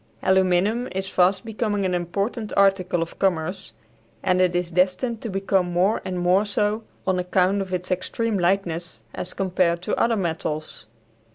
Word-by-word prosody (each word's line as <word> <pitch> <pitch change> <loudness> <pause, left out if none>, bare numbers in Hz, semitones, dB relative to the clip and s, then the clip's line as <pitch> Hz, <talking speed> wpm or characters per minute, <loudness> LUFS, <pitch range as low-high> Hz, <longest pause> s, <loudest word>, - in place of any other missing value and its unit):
Aluminum 190 +5 +2
is 190 0 -3
fast 190 +3 +2
becoming 215 -3 -1
an 185 - 0
important 200 +5 -2
article 190 -3 +3
of 165 - -11
commerce, 175 - -1 0.5
and 185 0 +2
it 180 -1 +2
is 175 0 -1
destined 185 +7 +1
to 230 - -4
become 195 -2 0
more 185 +5 +2
and 185 -1 -4
more 180 +3 +3
so 210 +1 0 0.2
on 185 -1 +1
account 185 +2 +1
of 190 -1 -5
its 180 0 -3
extreme 205 +3 -1
lightness 175 - -1
as 180 - -6
compared 180 -2 +1
to 210 - -1
other 230 0 +2
metals. 155 - -3
185 Hz, 160 wpm, -23 LUFS, 175-200 Hz, 0.5 s, article